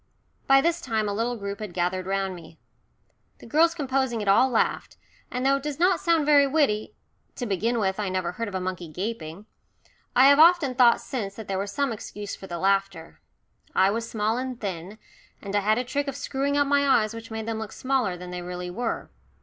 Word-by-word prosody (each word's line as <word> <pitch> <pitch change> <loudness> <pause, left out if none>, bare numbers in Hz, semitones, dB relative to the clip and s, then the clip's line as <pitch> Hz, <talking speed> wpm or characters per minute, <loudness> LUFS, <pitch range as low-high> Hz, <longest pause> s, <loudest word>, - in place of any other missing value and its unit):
By 270 0 +6
this 335 +3 0
time 220 -4 -1
a 205 - -1
little 230 +4 -1
group 200 -1 -5
had 210 -5 -7
gathered 185 +1 -1
round 195 -1 -1
me. 165 -2 -12 0.8
The - - -14
girls 330 +7 +3
composing 265 -5 -1
it 205 - -4
all 225 +7 +5
laughed, 235 - -1 0.3
and 250 +1 -3
though 275 0 +4
it - - -7
does 295 -1 -4
not 360 +2 +3
sound 335 -3 +2
very 285 -1 +5
witty 270 -8 0 0.4
to 245 - -4
begin 225 +3 0
with, 190 -1 0
I 205 -2 -1
never 185 -2 -2
heard 230 +5 -4
of 200 - -6
a - - 0
monkey 180 -2 -4
"gaping" 180 +1 -5 0.7
I 255 +2 +7
have 285 +1 +5
often 325 -5 +6
thought 245 -2 +5
since 200 -7 -5
that 220 - -9
there 190 -1 -2
was 200 +1 -3
some 280 +4 0
excuse 205 -2 -6
for 190 - -11
the 175 - -5
laughter. 195 +2 -1 0.5
I 190 +1 +4
was 230 +2 -3
small 220 +2 0
and 255 -2 -5
thin, 190 0 -5 0.4
and 200 0 -5
I - - +4
had 215 +2 +2
a 250 - 0
trick 285 +3 -2
of 275 - -3
screwing 280 0 -1
up 285 - +3
my 285 0 +2
eyes 220 -5 +3
which 230 0 -9
made 220 -1 -5
them 225 -1 -3
look 220 -1 -6
smaller 255 -9 -1
than 180 0 -9
they 180 0 -5
really 180 0 -6
were. 230 +5 -4
220 Hz, 220 wpm, -25 LUFS, 195-270 Hz, 0.8 s, I